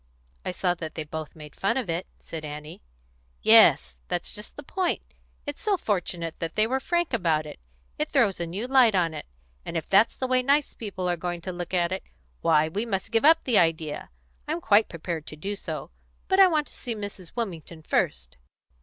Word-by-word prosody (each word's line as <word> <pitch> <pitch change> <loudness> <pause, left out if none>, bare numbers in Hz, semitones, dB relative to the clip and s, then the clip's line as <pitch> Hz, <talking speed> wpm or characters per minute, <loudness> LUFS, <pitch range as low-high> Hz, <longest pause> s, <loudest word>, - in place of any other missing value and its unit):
"I - - -3
saw 180 0 0
that 165 -3 -7
they 160 - -3
both 155 0 -7
made 150 -2 -11
fun 195 - 0
of 255 -6 -2
it," 170 +2 -2
said 160 -1 -8
Annie. 150 +1 -8 0.6
"Yes; 60 -1 +6
that's 175 - -3
just 210 0 -10
the 290 - -8
point. 365 +4 -1 0.4
It's 290 -1 -6
so 415 -3 +2
fortunate 175 - -2
they 170 +6 +1
were 260 +4 0
frank 345 +1 0
about 165 -8 +1
it. 150 - -9 0.4
It - - 0
throws 195 -3 +2
a 170 - -2
new 195 +8 -3
light 255 -5 +5
on 170 -3 +2
it; 155 - -7 0.4
and 170 - -4
if 160 - -3
that's 200 +4 +4
the 260 - -2
way 255 0 +3
nice 280 +3 +2
people 195 -5 -4
are 175 - +1
going 175 0 -3
to 185 - -4
look 175 -1 -5
at 175 -1 +2
it, 190 - -2 0.4
why, 150 - +4
we 200 +7 -2
must 210 -2 -3
give 230 +4 +3
up 325 +1 +6
the 240 -5 +4
idea. 160 -3 0 0.4
I'm - - -1
quite 210 +3 +4
prepared 165 -1 -5
to - - -8
do 195 +7 -4
so. - - -6 0.4
But 380 0 +3
I 385 - +10
want 310 -4 +1
to - - -15
see 240 -3 -4
Mrs. 200 -4 -7
Wilmington 170 -8 -5
first." 65 - -1
180 Hz, 205 wpm, -26 LUFS, 165-230 Hz, 0.6 s, I